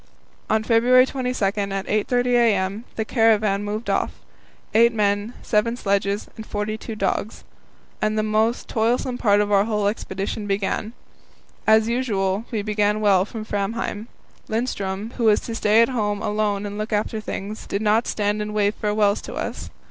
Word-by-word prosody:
On 220 Hz, 0 st, +2 dB
February 245 Hz, +3 st, +5 dB
22, 255 Hz, -5 st, -2 dB
at 195 Hz, -, +1 dB
8.30 205 Hz, +5 st, 0 dB
a.m., 220 Hz, -3 st, +2 dB
the 220 Hz, -, -2 dB
caravan 215 Hz, -4 st, +2 dB
moved 210 Hz, +3 st, -4 dB
off -, -, +1 dB, 0.6 s
eight 235 Hz, +2 st, +6 dB
men, 205 Hz, +2 st, 0 dB
seven 230 Hz, +2 st, +1 dB
sledges, 200 Hz, -1 st, 0 dB
and 220 Hz, -, -7 dB
forty 210 Hz, 0 st, -3 dB
two 220 Hz, 0 st, -7 dB
dogs 200 Hz, +1 st, -2 dB, 0.6 s
and 215 Hz, 0 st, 0 dB
the 215 Hz, -, +1 dB
most 220 Hz, +2 st, +1 dB
toilsome 245 Hz, +2 st, 0 dB
part 205 Hz, -2 st, +4 dB
of 205 Hz, 0 st, -1 dB
our 200 Hz, 0 st, +4 dB
whole 210 Hz, -2 st, -1 dB
expedition 200 Hz, 0 st, -3 dB
began. 200 Hz, +2 st, -1 dB, 0.7 s
As 220 Hz, 0 st, +5 dB
usual, 215 Hz, -4 st, 0 dB
we 215 Hz, -3 st, -2 dB
began 210 Hz, 0 st, +1 dB
well 195 Hz, -3 st, +4 dB
from 215 Hz, 0 st, -7 dB
Framheim. 210 Hz, +1 st, -3 dB, 0.4 s
Lindström, 220 Hz, -2 st, -2 dB
who 235 Hz, -, 0 dB
was 210 Hz, -1 st, +5 dB
to 230 Hz, -, -6 dB
stay 220 Hz, 0 st, +4 dB
at 230 Hz, -, 0 dB
home 210 Hz, -5 st, -1 dB
alone 210 Hz, -1 st, -1 dB
and 205 Hz, +1 st, -5 dB
look 215 Hz, +1 st, -4 dB
after 215 Hz, +1 st, -1 dB
things, 210 Hz, +1 st, -6 dB
did 200 Hz, +2 st, -2 dB
not 220 Hz, +2 st, +2 dB
stand 210 Hz, 0 st, -1 dB
and 210 Hz, 0 st, -4 dB
wave 205 Hz, 0 st, +2 dB
farewells 210 Hz, -1 st, +1 dB
to -, -, -8 dB
us. -, -, -5 dB
215 Hz, 165 wpm, -23 LUFS, 205-225 Hz, 0.7 s, eight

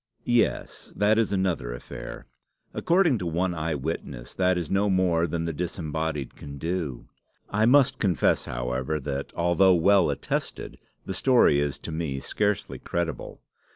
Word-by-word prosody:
"Yes 120 Hz, -2 st, 0 dB
that 105 Hz, +2 st, +3 dB
is 110 Hz, -3 st, +1 dB
another 95 Hz, -11 st, 0 dB
affair. -, -, -8 dB, 0.5 s
According 170 Hz, -, +2 dB
to 90 Hz, -, -3 dB
one 90 Hz, +2 st, 0 dB
eyewitness 75 Hz, -6 st, -4 dB
that 90 Hz, -1 st, +2 dB
is 85 Hz, -4 st, -4 dB
no 100 Hz, +1 st, +2 dB
more 90 Hz, -3 st, +2 dB
than 85 Hz, +1 st, -2 dB
the 85 Hz, -, -2 dB
disembodied 80 Hz, -3 st, -3 dB
can 70 Hz, -1 st, -9 dB
do. 80 Hz, -5 st, -3 dB, 0.4 s
I 110 Hz, +2 st, +3 dB
must 135 Hz, 0 st, +4 dB
confess, 95 Hz, -5 st, +2 dB
however, 65 Hz, +5 st, -2 dB
that, 70 Hz, 0 st, -4 dB
although 85 Hz, +2 st, +4 dB
well 95 Hz, 0 st, +4 dB
attested, 70 Hz, 0 st, -3 dB, 0.3 s
the 95 Hz, -, -4 dB
story 120 Hz, -, +4 dB
is 70 Hz, -1 st, -1 dB
to -, -, -8 dB
me 80 Hz, -4 st, -3 dB
scarcely 105 Hz, +6 st, -1 dB
credible. 85 Hz, -1 st, -4 dB
85 Hz, 145 wpm, -26 LUFS, 75-95 Hz, 0.5 s, must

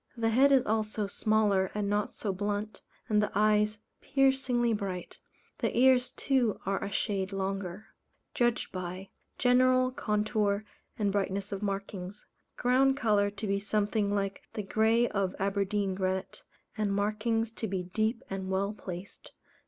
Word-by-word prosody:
The 225 Hz, -1 st, +1 dB
head 265 Hz, +5 st, +5 dB
is 265 Hz, -2 st, +5 dB
also 215 Hz, -1 st, 0 dB
smaller 205 Hz, -2 st, +2 dB
and 210 Hz, -1 st, -1 dB
not 205 Hz, 0 st, -1 dB
so 200 Hz, -3 st, -2 dB
blunt, 205 Hz, +2 st, -3 dB, 0.3 s
and 210 Hz, -1 st, +3 dB
the 210 Hz, -, -1 dB
eyes 210 Hz, +1 st, +3 dB, 0.2 s
piercingly 265 Hz, -3 st, +2 dB
bright; 195 Hz, -4 st, -4 dB, 0.4 s
the -, -, -1 dB
ears 250 Hz, 0 st, +5 dB
too 255 Hz, -6 st, 0 dB
are 195 Hz, +1 st, -1 dB
a 200 Hz, -, -3 dB
shade 195 Hz, -2 st, -1 dB
longer. 195 Hz, 0 st, -3 dB, 0.5 s
Judged 240 Hz, -2 st, +1 dB
by: 185 Hz, +1 st, -6 dB, 0.3 s
General 255 Hz, 0 st, +4 dB
contour, 210 Hz, -2 st, 0 dB, 0.3 s
and 205 Hz, -3 st, +1 dB
brightness 200 Hz, 0 st, -1 dB
of 200 Hz, 0 st, -4 dB
markings. 195 Hz, -1 st, -4 dB, 0.3 s
Ground 265 Hz, +2 st, +3 dB
colour 210 Hz, -5 st, +2 dB
to 205 Hz, +2 st, -6 dB
be 200 Hz, -1 st, 0 dB
something 205 Hz, 0 st, 0 dB
like 195 Hz, -1 st, -2 dB
the 210 Hz, -, -2 dB
grey 220 Hz, +4 st, +3 dB
of 195 Hz, -2 st, -1 dB
Aberdeen 200 Hz, 0 st, 0 dB
granite, 185 Hz, 0 st, -2 dB, 0.3 s
and 210 Hz, -2 st, 0 dB
markings 215 Hz, +2 st, 0 dB
to 225 Hz, 0 st, -4 dB
be 190 Hz, -2 st, -2 dB
deep 220 Hz, +7 st, -1 dB
and 190 Hz, -1 st, -4 dB
well 195 Hz, +2 st, 0 dB
placed. 185 Hz, -2 st, -9 dB
210 Hz, 145 wpm, -30 LUFS, 195-225 Hz, 0.5 s, head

